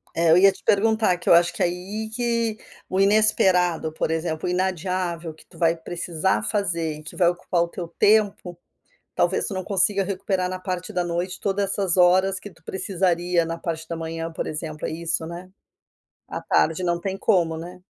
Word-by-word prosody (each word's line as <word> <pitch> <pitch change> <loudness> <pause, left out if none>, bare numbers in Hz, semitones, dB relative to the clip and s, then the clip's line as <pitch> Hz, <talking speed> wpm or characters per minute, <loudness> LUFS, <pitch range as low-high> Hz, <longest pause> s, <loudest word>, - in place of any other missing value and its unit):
É, 165 -1 +3
eu 170 - +7
ia 195 +1 +7
te - - -16
perguntar, 215 -2 +3
que 175 - -3
eu - - +8
acho 175 0 +4
que - - -6
aí 190 +5 -2
que 230 -2 0 0.3
o 190 - -1
inesperado, 190 -6 +3
por - - -2
exemplo, 160 0 -2
o - - 0
inadiável, 180 -2 -2
que - - -19
tu - - -19
vai 165 -1 +3
precisar 175 +2 -1
fazer 170 -7 -1
e 155 - -12
que - - -10
vai 175 -2 +4
ocupar 175 0 -1
o 170 - +1
teu 170 0 -6
tempo, 200 -1 +2 0.6
talvez - - +1
tu 205 - -4
não 185 - -3
consiga 195 +1 +2
recuperar 190 -1 -1
na 185 0 -4
parte 185 -1 -4
da 180 -1 0
noite 175 +2 -3
toda 200 0 0
essas 195 -2 0
horas 185 +2 +4
que 205 - -9
tu 160 - -24
precisaria 180 -2 0
na 165 +1 -4
parte 160 -1 -5
da 170 - -4
manhã, 165 0 -5
por - - -4
exemplo. 155 0 -5
É - - -4
isso, 165 0 -2
né? 175 +2 -8 0.8
À - - -5
tarde 165 +3 +1
não 170 0 0
tem 195 0 -3
como, 170 -6 +2
né. 180 +2 -9
180 Hz, 195 wpm, -23 LUFS, 170-195 Hz, 0.8 s, eu